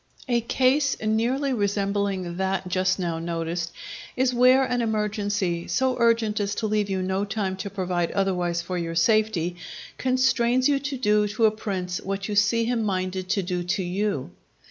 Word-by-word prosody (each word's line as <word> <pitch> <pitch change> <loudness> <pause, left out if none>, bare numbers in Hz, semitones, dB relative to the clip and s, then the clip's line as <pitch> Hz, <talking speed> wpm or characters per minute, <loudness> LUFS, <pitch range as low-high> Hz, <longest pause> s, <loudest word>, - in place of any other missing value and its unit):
A 240 -2 +2
case 265 +4 +2
nearly 240 +6 0
resembling 200 -4 -1
that 190 0 -1
just 185 +1 +1
now 170 -3 -2
noticed, 165 0 -3 0.4
is 255 0 +1
where 255 +2 +5
an 245 -2 0
emergency, 205 -5 -1
so 260 -1 +1
urgent 230 -2 +2
as 205 0 -1
to 225 - -2
leave 210 -1 0
you 190 -1 -1
no 190 +1 -1
time 200 -2 -2
to 200 +1 -5
provide 180 -3 -1
otherwise 180 -3 0
for 180 +1 -3
your 165 -1 -4
safety, 180 -3 +2 0.4
constrains 255 -1 +2
you 285 -1 +2
to 280 0 -4
do 210 -3 +2
to 215 +2 +1
a 215 - +5
prince 190 -4 -4
what 195 0 -3
you 210 - -3
see 215 +3 +3
him 235 -1 0
minded 185 -2 -2
to 195 0 +1
do 180 0 -2
to 180 +2 -1
you. 180 - -2
205 Hz, 170 wpm, -25 LUFS, 185-230 Hz, 0.4 s, where